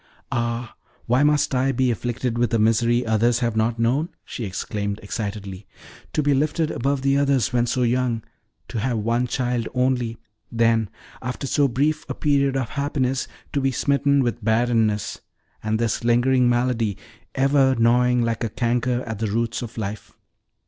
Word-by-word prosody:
"Ah, 120 -1 -2 0.3
why 125 +3 +2
must 150 -1 +3
I 130 +1 +2
be 130 -1 +1
afflicted 120 +1 -2
with 120 -2 +1
a - - +4
misery 115 +2 +2
others 115 +2 +2
have 115 -2 0
not 110 +1 +1
known!" 130 +8 +1 0.2
she 115 - -5
exclaimed 100 +1 -3
excitedly. 100 -2 -5 0.5
"To 150 - +1
be 145 0 +3
lifted 155 +3 0
above 135 +1 -1
the 140 0 +3
others, 140 -4 +1
when 120 -1 +2
so 125 +2 0
young; 120 -2 0 0.5
to 115 - -3
have 120 +1 0
one 115 +3 0
child 125 -2 -1
only; 125 -3 0 0.3
then 115 -2 +2 0.3
after 125 +3 -4
so 140 +1 +2
brief 145 +5 0
a - - -3
period 140 -2 +1
of 130 -4 -2
happiness, 135 -3 -1 0.3
to 140 - +1
be 135 - +2
smitten 140 +1 +2
with 120 -2 -2
barrenness, 110 -2 +1 0.4
and 110 0 0
this 115 0 -1
lingering 120 +1 +3
malady 120 -4 0 0.4
ever 135 0 +3
gnawing 125 +1 +3
like 115 0 -1
a 115 - -1
canker 120 +2 0
at 110 -3 -5
the 110 - 0
roots 115 +2 -1
of 120 -1 -8
life! 105 -1 -6
120 Hz, 165 wpm, -23 LUFS, 115-130 Hz, 0.5 s, a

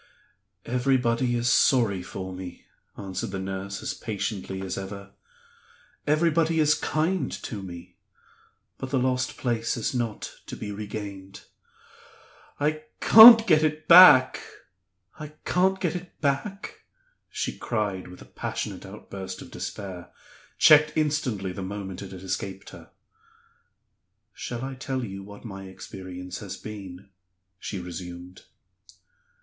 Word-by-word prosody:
"Everybody 125 -1 +1
is 120 0 -1
sorry 115 -5 +3
for 95 +1 -7
me," 90 -1 -9 0.3
answered 95 -2 -5
the 95 - -4
nurse, 95 +1 -5
as - - -2
patiently 100 -3 -4
as 95 - -4
ever; 100 0 -7 1.0
"everybody 160 +1 +2
is 150 -1 +5
kind 155 -1 -1
to 105 -4 -5
me. 90 -1 -10 0.8
But 130 - -5
the 135 - 0
lost 130 0 0
place 115 -2 -1
is 115 - -2
not 120 -4 -4
to - - -6
be 105 - -6
regained. 100 -2 -7 1.2
I 155 +1 -1
can't 225 +1 +10
get 155 -4 +2
back! 170 -7 +9 0.8
I 150 0 -8
can't 190 +1 +2
get 180 0 -4
back?" 155 +8 -3 0.5
she - - -3
cried, 105 -6 -3
with 90 0 -12
a - - -17
passionate - - -5
outburst 95 -1 -8
of - - -14
despair 95 -4 -7 0.5
checked 155 -1 +6
instantly 140 -11 -1
the 95 - -7
moment 95 -1 -6
it 100 - -8
had 95 -1 -10
escaped 95 +1 -5
her. - - -13 1.4
"Shall 120 +1 -5
I 135 - -5
tell 130 -1 -4
you 95 -2 -7
what 100 +3 -12
my 95 -3 -8
experience 95 -1 -8
has - - -7
been?" 95 -3 -9 0.5
she 100 - -5
resumed. 90 0 -9
110 Hz, 125 wpm, -26 LUFS, 95-145 Hz, 1.4 s, can't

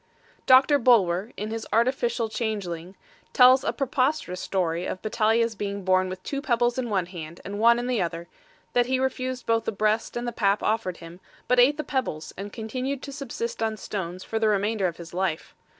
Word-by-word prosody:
Doctor 270 +3 +6
Bulwer, 210 -4 +3
in 210 +2 -4
his 225 0 -5
Artificial 235 0 +1
Changeling, 200 -6 -4 0.4
tells 255 0 +7
a - - 0
preposterous 260 - -1
story 175 -3 -1
of 185 - -4
Battalia's 225 +1 +2
being 200 -1 -4
born 185 0 +2
with 185 0 -7
two 275 -1 -3
pebbles 240 -2 +1
in 245 -2 -2
one 190 -4 +1
hand 170 -2 -9
and 205 +1 -5
one 235 +1 +6
in 240 - -2
the 250 -4 0
other; 170 0 -3 0.5
that 245 0 +3
he 260 0 +1
refused 255 -1 -2
both 225 -1 +1
the - - 0
breast 215 +3 0
and 240 0 -3
the - - -1
pap 200 -2 +1
offered 210 -5 -1
him, 170 +1 -11 0.3
but 250 0 +3
ate 275 +4 +5
the 305 - -2
pebbles 255 - -3
and 200 +2 -7
continued 255 +5 -4
to 280 - -6
subsist 255 -5 -5
on 220 -1 -1
stones 185 -3 -5
for 225 - -3
the 220 - +2
remainder 205 -1 +1
of 170 - -5
his 170 0 -10
life. 180 -3 -2
220 Hz, 200 wpm, -25 LUFS, 185-245 Hz, 0.5 s, tells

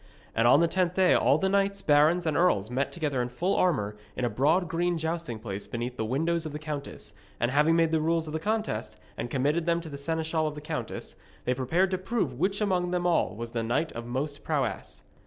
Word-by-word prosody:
And 115 +1 +3
on 140 +6 +6
the 170 - +4
tenth 180 0 0
day 185 -1 +5
all - - +4
the 190 - +1
knights, 200 0 +1
barons, 155 +4 +4
and 155 -2 0
earls 115 - +2
met 135 +3 -1
together 145 -6 -1
in 120 - -2
full 180 +10 -1
armour 105 - +1 0.2
in 125 - -1
a 120 - -1
broad 155 - +2
green 175 +1 0
jousting 160 -6 -3
place 100 -2 -6
beneath 120 +1 -4
the 110 - -2
windows 160 +8 0
of 150 - -8
the - - -3
countess, 150 -8 -6 0.3
and 120 +1 +1
having 150 +4 +4
made 165 -1 +3
the 160 -1 +2
rules 165 0 +1
of 155 +1 -3
contest, 215 - -2 0.2
and 120 - -4
committed 145 +7 0
them 170 0 +2
to 165 - -8
the 140 -1 -7
seneschal 160 +1 -1
of 150 - -4
the - - -6
countess, 150 - -5 0.3
they 125 - +2
prepared 165 +9 +1
to 185 - 0
prove 190 - -1
which 195 +4 0
among 180 -4 +1
them 180 0 -1
all 175 -2 +2
was 115 +1 -6
the 115 - -2
knight 120 +8 0
of 115 0 -7
most 140 +4 -3
prowess. - - -2
160 Hz, 230 wpm, -28 LUFS, 125-175 Hz, 0.3 s, on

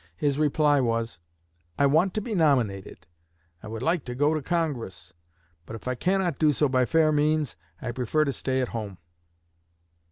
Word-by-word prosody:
His 145 -1 0
reply 150 -1 +3
was: 115 -6 -1 0.6
'I 140 - +3
want 160 +7 +3
to 215 - 0
be 225 +1 -5
nominated; 125 - 0 0.6
I - - -10
would 110 +2 -6
like 165 -1 +1
to 125 -1 -5
go 145 +4 +2
to 155 - -1
Congress; 130 - -3 0.5
but 110 - -7
if 115 - -10
I 125 - 0
cannot 180 +2 0
do 155 -2 +4
so 150 +1 +2
by 130 -1 +2
fair 160 +2 +3
means, 150 - +1 0.3
I 120 - -2
prefer 130 +5 0
to 140 - -1
stay 130 +1 -1
at 125 - -2
home.' 105 -5 -5
140 Hz, 180 wpm, -26 LUFS, 120-155 Hz, 0.6 s, do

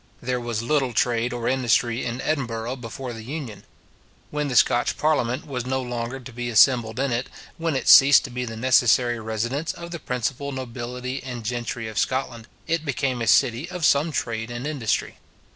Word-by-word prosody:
There 125 0 -2
was 115 -2 -3
little 135 -1 +1
trade 120 +1 +1
or 120 -1 -3
industry 120 -2 +1
in 120 +1 -3
Edinburgh 120 -4 -2
before 120 +1 -7
the 110 - -8
Union. 125 -3 -7 0.7
When 150 0 -1
the 130 - -3
Scotch 120 - +3
parliament 145 -4 0
was 130 -4 -4
no 130 +1 -1
longer 120 0 -4
to 130 -1 -11
be 120 +1 -4
assembled 120 0 +4
in 135 -1 0
it, 120 +2 -2 0.3
when 165 -3 -1
it 130 - -2
ceased 135 +1 +8
to 130 - -7
be 125 +1 -3
the 115 -2 -6
necessary 120 -1 +3
residence 120 +8 -2
of 170 0 -9
the 170 - -5
principal 130 +2 -3
nobility 125 0 -5
and 125 -3 -7
gentry 120 -1 -3
of 110 - -3
Scotland, 125 -3 -2 0.2
it 165 -1 -1
became 135 -4 -1
a 115 - -1
city 130 +4 +3
of 180 -3 -2
some 145 +3 +3
trade 115 -4 -3
and 120 +2 -5
industry. 140 -7 -2
125 Hz, 185 wpm, -24 LUFS, 120-135 Hz, 0.7 s, ceased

